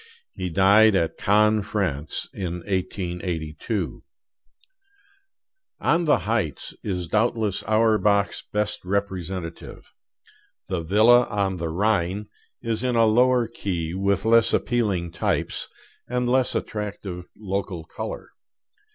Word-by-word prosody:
He 90 Hz, -, -4 dB
died 100 Hz, +4 st, +5 dB
at 80 Hz, -3 st, +1 dB
Cannes, 105 Hz, +1 st, +4 dB
France, 80 Hz, -8 st, -2 dB
in 90 Hz, -2 st, -4 dB
1882. 90 Hz, -1 st, -3 dB, 1.8 s
'On 170 Hz, +1 st, +2 dB
the 150 Hz, -, +4 dB
Heights' 105 Hz, -, -2 dB
is 90 Hz, -3 st, -2 dB
doubtless 110 Hz, -1 st, +1 dB
Auerbach's 105 Hz, -2 st, +2 dB
best 105 Hz, 0 st, -1 dB
representative. 95 Hz, -3 st, -4 dB, 0.8 s
'The 95 Hz, -3 st, -1 dB
Villa 110 Hz, +8 st, +5 dB
on 100 Hz, -3 st, -1 dB
the 85 Hz, -1 st, -3 dB
Rhine' 100 Hz, +2 st, 0 dB, 0.4 s
is 115 Hz, 0 st, -2 dB
in 125 Hz, -1 st, 0 dB
a 115 Hz, -1 st, +5 dB
lower 120 Hz, +2 st, +3 dB
key, 90 Hz, -7 st, -4 dB
with 100 Hz, +2 st, 0 dB
less 115 Hz, 0 st, +4 dB
appealing 100 Hz, -8 st, 0 dB
types, -, -, -1 dB, 0.4 s
and 125 Hz, 0 st, -1 dB
less 130 Hz, +1 st, +2 dB
attractive 100 Hz, -4 st, -4 dB
local 100 Hz, -4 st, -4 dB
color. -, -, -7 dB
100 Hz, 110 wpm, -24 LUFS, 90-110 Hz, 1.8 s, died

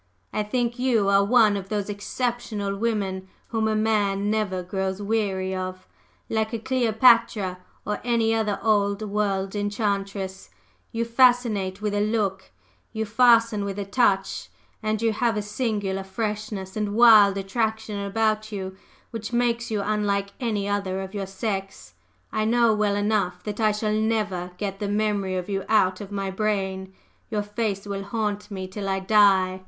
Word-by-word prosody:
"I -, -, 0 dB
think 240 Hz, +3 st, -1 dB
you 235 Hz, -6 st, +2 dB
are 200 Hz, 0 st, +5 dB
one 215 Hz, -1 st, +4 dB
of 195 Hz, -1 st, -5 dB
those 205 Hz, -2 st, -2 dB
exceptional 210 Hz, -1 st, -3 dB
women 195 Hz, -4 st, -2 dB, 0.2 s
whom 220 Hz, -2 st, 0 dB
a 215 Hz, -, +1 dB
man 205 Hz, -2 st, +1 dB
never 200 Hz, -4 st, -1 dB
grows 190 Hz, +1 st, -3 dB
weary 200 Hz, -3 st, -1 dB
of: 185 Hz, 0 st, -5 dB, 0.4 s
like 220 Hz, +1 st, -1 dB
a -, -, 0 dB
Cleopatra, 230 Hz, -5 st, +3 dB, 0.3 s
or 210 Hz, 0 st, -3 dB
any 230 Hz, -2 st, +2 dB
other 215 Hz, -3 st, 0 dB
old 205 Hz, -1 st, +2 dB
world 200 Hz, -2 st, -1 dB
enchantress, 200 Hz, -2 st, -2 dB, 0.4 s
you 230 Hz, 0 st, -1 dB
fascinate 230 Hz, -5 st, +2 dB
with 210 Hz, -1 st, 0 dB
a 205 Hz, -, +1 dB
look, 205 Hz, -3 st, -1 dB, 0.4 s
you 220 Hz, 0 st, -2 dB
fasten 230 Hz, -1 st, +4 dB
with 200 Hz, 0 st, -4 dB
a 200 Hz, -, -3 dB
touch, 195 Hz, -2 st, +1 dB, 0.3 s
and 215 Hz, 0 st, -1 dB
you 225 Hz, -1 st, +2 dB
have 230 Hz, 0 st, 0 dB
a 210 Hz, -, -1 dB
singular 210 Hz, -3 st, -2 dB
freshness 210 Hz, -1 st, -4 dB
and 210 Hz, -1 st, -2 dB
wild 215 Hz, -4 st, +7 dB
attraction 215 Hz, +1 st, -2 dB
about 215 Hz, +1 st, 0 dB
you 190 Hz, -2 st, -5 dB, 0.4 s
which 225 Hz, -1 st, -5 dB
makes 235 Hz, -1 st, 0 dB
you 210 Hz, -2 st, -1 dB
unlike 200 Hz, -2 st, 0 dB
any 215 Hz, -5 st, -1 dB
other 195 Hz, -2 st, -1 dB
of 190 Hz, +1 st, -7 dB
your 200 Hz, -2 st, -3 dB
sex. 195 Hz, 0 st, -4 dB, 0.4 s
I 215 Hz, -, 0 dB
know 235 Hz, 0 st, +4 dB
well 210 Hz, -1 st, +1 dB
enough 205 Hz, -4 st, 0 dB
that 210 Hz, 0 st, -5 dB
I 215 Hz, -1 st, +3 dB
shall 210 Hz, 0 st, -1 dB
never 215 Hz, -5 st, 0 dB
get 195 Hz, -2 st, -4 dB
the 205 Hz, -, -2 dB
memory 205 Hz, -2 st, 0 dB
of 180 Hz, -1 st, -3 dB
you 195 Hz, -2 st, -2 dB
out 190 Hz, -4 st, +3 dB
of 205 Hz, -1 st, -8 dB
my 195 Hz, -1 st, -2 dB
brain; 190 Hz, -2 st, -2 dB, 0.4 s
your 210 Hz, -3 st, -1 dB
face 205 Hz, -1 st, -3 dB
will 200 Hz, -1 st, -4 dB
haunt 210 Hz, -1 st, -2 dB
me 190 Hz, -2 st, -5 dB
till 195 Hz, +1 st, -5 dB
I 195 Hz, 0 st, 0 dB
die!" 190 Hz, -2 st, +4 dB
205 Hz, 160 wpm, -25 LUFS, 195-220 Hz, 0.4 s, wild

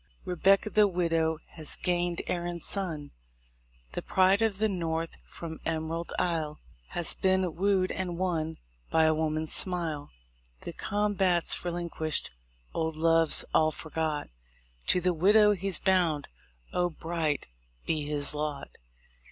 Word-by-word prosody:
Rebecca 195 Hz, +4 st, +2 dB
the 210 Hz, -1 st, +5 dB
widow 165 Hz, -3 st, 0 dB
has 155 Hz, -2 st, -1 dB
gained 175 Hz, -1 st, -1 dB
Erin's 175 Hz, -1 st, -3 dB
son; 165 Hz, -7 st, -3 dB, 0.8 s
The -, -, -4 dB
pride 190 Hz, +3 st, +3 dB
of 220 Hz, -3 st, +1 dB
the 220 Hz, +2 st, +2 dB
north 165 Hz, -4 st, -3 dB
from 160 Hz, -1 st, -8 dB
Emerald 165 Hz, +1 st, -3 dB
Isle 160 Hz, -4 st, -1 dB, 0.3 s
Has 175 Hz, -, +5 dB
been 190 Hz, -2 st, +1 dB
wooed 190 Hz, 0 st, +1 dB
and 180 Hz, -2 st, -4 dB
won 160 Hz, -3 st, -2 dB, 0.3 s
by 160 Hz, -, +3 dB
a 160 Hz, 0 st, +4 dB
woman's 155 Hz, 0 st, -1 dB
smile. 170 Hz, -6 st, 0 dB, 0.5 s
The -, -, -7 dB
combat's 195 Hz, -4 st, +2 dB
relinquished, 170 Hz, -3 st, -1 dB, 0.4 s
old 160 Hz, -1 st, -2 dB
loves 165 Hz, 0 st, +5 dB
all 155 Hz, 0 st, +4 dB
forgot: 155 Hz, -1 st, -3 dB, 0.6 s
To 180 Hz, -, +3 dB
the 180 Hz, 0 st, +2 dB
widow 210 Hz, +5 st, +5 dB
he's 195 Hz, -1 st, +2 dB
bound. 175 Hz, -6 st, +1 dB, 0.4 s
Oh, 180 Hz, 0 st, +1 dB
bright 160 Hz, -2 st, -2 dB, 0.4 s
be 155 Hz, -2 st, 0 dB
his 145 Hz, -1 st, 0 dB
lot! 150 Hz, -2 st, -5 dB
170 Hz, 125 wpm, -28 LUFS, 160-185 Hz, 0.8 s, the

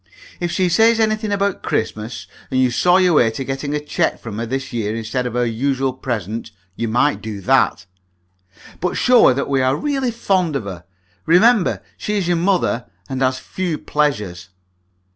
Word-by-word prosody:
If 175 Hz, -, -1 dB
she 185 Hz, 0 st, +1 dB
says 225 Hz, +6 st, +4 dB
anything 215 Hz, -1 st, +1 dB
about 200 Hz, -1 st, 0 dB
Christmas, 110 Hz, +1 st, -3 dB, 0.2 s
and 130 Hz, -, 0 dB
you 130 Hz, -1 st, +3 dB
saw 180 Hz, +9 st, +4 dB
your 180 Hz, -2 st, +4 dB
way 120 Hz, -7 st, +5 dB
to 125 Hz, +5 st, -5 dB
getting 135 Hz, +2 st, -3 dB
a -, -, 0 dB
cheque 150 Hz, -, -1 dB
from 110 Hz, -2 st, -7 dB
her 115 Hz, -, -3 dB
this 135 Hz, +2 st, -4 dB
year 110 Hz, -2 st, -2 dB
instead 115 Hz, +3 st, -2 dB
of 120 Hz, -, -6 dB
her 125 Hz, 0 st, +2 dB
usual 130 Hz, +3 st, -1 dB
present, 115 Hz, -4 st, -4 dB, 0.3 s
you 115 Hz, -, -2 dB
might 120 Hz, +6 st, +1 dB
do 110 Hz, -2 st, -6 dB
that. 90 Hz, -, +2 dB, 0.9 s
But 180 Hz, +1 st, -1 dB
show 250 Hz, -2 st, +5 dB
her 125 Hz, -, +4 dB
that 140 Hz, -, -2 dB
we 135 Hz, -1 st, +1 dB
are 130 Hz, +1 st, +2 dB
really 270 Hz, -, -1 dB
fond 190 Hz, -8 st, 0 dB
of 135 Hz, -, -1 dB
her 90 Hz, -3 st, -8 dB, 0.4 s
remember 200 Hz, +4 st, +4 dB
she 210 Hz, -, -3 dB
is 190 Hz, -4 st, -1 dB
your 175 Hz, -1 st, +2 dB
mother, 175 Hz, -9 st, +1 dB, 0.2 s
and 130 Hz, 0 st, -3 dB
has 130 Hz, 0 st, +2 dB
few 175 Hz, +4 st, -3 dB
pleasures. 105 Hz, -16 st, -2 dB
135 Hz, 185 wpm, -19 LUFS, 115-180 Hz, 0.9 s, way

